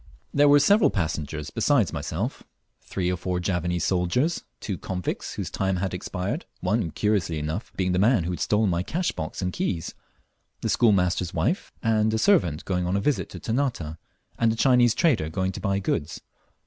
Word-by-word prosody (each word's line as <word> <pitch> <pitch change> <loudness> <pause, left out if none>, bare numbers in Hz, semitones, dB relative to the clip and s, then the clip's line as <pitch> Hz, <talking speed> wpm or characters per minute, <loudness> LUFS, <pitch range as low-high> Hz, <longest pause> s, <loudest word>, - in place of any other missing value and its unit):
There 145 0 +5
were 145 - +8
several 205 +7 +5
passengers 80 -4 -3
besides 115 - +2
myself: - - -3 0.4
three 90 -2 -2
or - - 0
four 90 +1 -2
Javanese 90 -1 -1
soldiers, 95 - +1 0.2
two 95 -5 -4
convicts 90 -2 -4
whose - - -4
time 95 -1 0
had 95 +1 -2
expired 95 - -3
(one, 95 0 0
curiously 95 -1 0
enough, 80 +8 -4
being 95 -1 +1
the 90 - +1
man 110 -2 +4
who 85 - -2
had 90 - -4
stolen 105 +4 +2
my 85 0 0
cash 170 - -1
box 80 +4 -5
and 90 0 -2
keys), 85 -4 -2 0.7
the - - -1
schoolmaster's 90 -6 +2
wife - - 0
and 110 -1 +2
a - - +1
servant 105 - +2
going 90 -2 -1
on 95 +2 +1
a - - +1
visit 145 +8 0
to - - -8
Ternate, 115 - -2 0.4
and 115 -1 +3
a - - -2
Chinese 120 -1 +4
trader 130 - +2
going 95 +3 -1
to - - -7
buy 100 -1 0
goods. 85 -5 -2
95 Hz, 185 wpm, -25 LUFS, 90-115 Hz, 0.7 s, were